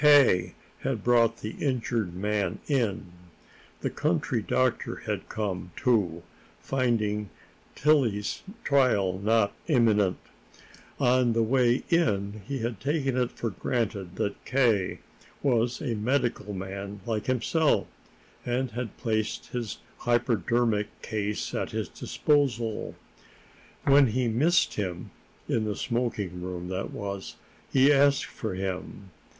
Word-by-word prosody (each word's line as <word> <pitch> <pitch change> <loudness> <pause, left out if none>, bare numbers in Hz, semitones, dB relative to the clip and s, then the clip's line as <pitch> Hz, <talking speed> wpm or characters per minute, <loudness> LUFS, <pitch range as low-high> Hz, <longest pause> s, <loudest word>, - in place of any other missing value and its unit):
K. 130 -12 +6 0.2
had 120 -7 -2
brought 115 -1 +3
the 105 - -4
injured 120 - -1
man 100 -1 -1
in. 115 - 0 0.7
The - - -1
country - - 0
doctor - - 0
had - - -3
come, 95 -5 -3
too, 95 -9 +1 0.4
finding 110 -6 0 0.5
Tillie's 130 -9 +2 0.2
trial 105 -10 +3
not 105 0 +2
imminent. 110 - +3 0.8
On 125 -1 +3
the 115 0 +2
way 125 +1 +3
in 105 - +1
he 140 0 -2
had 115 -3 -3
taken 140 -1 0
it 125 -1 +1
for 115 - -3
granted 100 -4 -2
that 100 +2 -3
K. 115 -8 +1 0.4
was 120 0 +1
a 125 -5 -1
medical 115 -1 0
man 100 +1 -6
like 110 -2 -2
himself, 135 +5 +2 0.6
and 125 +1 -1
had 120 -2 -5
placed 110 -1 -2
his 120 -4 -4 0.2
hypodermic 120 -2 +1
case 105 -1 -2
at - - -2
his - - -3
disposal. 120 -7 0 0.9
When 140 0 +6
he 125 +2 0
missed 150 +10 +3
him, 90 -4 -4 0.4
in 110 -2 +1
the 105 -1 -2
smoking 105 -7 -2
room, 90 0 -5
that 95 +1 -3
was, 100 -2 -5 0.4
he 135 +2 +6
asked 140 0 +4
for 110 -5 -5
him. 95 0 -5
115 Hz, 120 wpm, -27 LUFS, 100-125 Hz, 0.9 s, K